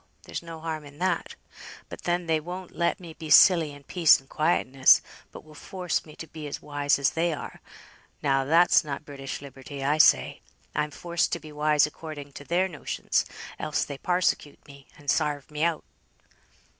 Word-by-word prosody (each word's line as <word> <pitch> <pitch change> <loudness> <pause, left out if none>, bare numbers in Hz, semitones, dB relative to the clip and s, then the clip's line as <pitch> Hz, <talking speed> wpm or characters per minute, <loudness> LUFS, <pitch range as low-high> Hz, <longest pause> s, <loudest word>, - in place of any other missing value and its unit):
there's - - -6
no 165 -1 -9
harm 160 -1 -4
in 145 0 -14
that. 185 +3 -1 0.5
But - - -10
then 175 0 0
they 160 -1 +1
won't 180 +3 -8
let 170 - 0
me 170 -3 -10
be 155 -1 -9
silly 165 -3 +7
in 145 0 -13
peace 165 +2 +5
and 135 - -21
quietness, 135 -5 +3 0.3
but - - -11
will 155 - -16
force 180 0 -3
me 155 - -13
to - - -8
be 155 -2 -8
as 145 - -5
wise 145 -1 0
as 140 -1 +2
they 170 +1 0
are; 150 - -8 0.6
now 135 -1 +2
that's 165 +6 +5
not 150 0 -6
British 140 -1 -7
liberty, 140 +1 -9
I 150 +3 +1
say. - - +4 0.3
I'm 150 0 -1
forced 170 +3 -1
to 170 - -1
be 155 -1 -12
wise 150 0 +3
according 150 -2 -8
to 145 - -10
their 175 +5 +1
notions, 155 -6 -2 0.3
else 150 - -1
they 140 -2 -7
parsecute 180 -5 -1
me, 140 -1 -15
and 145 - -17
sarve 150 -1 0
me 150 +1 -2
out." 170 -2 0
155 Hz, 185 wpm, -26 LUFS, 145-170 Hz, 0.6 s, silly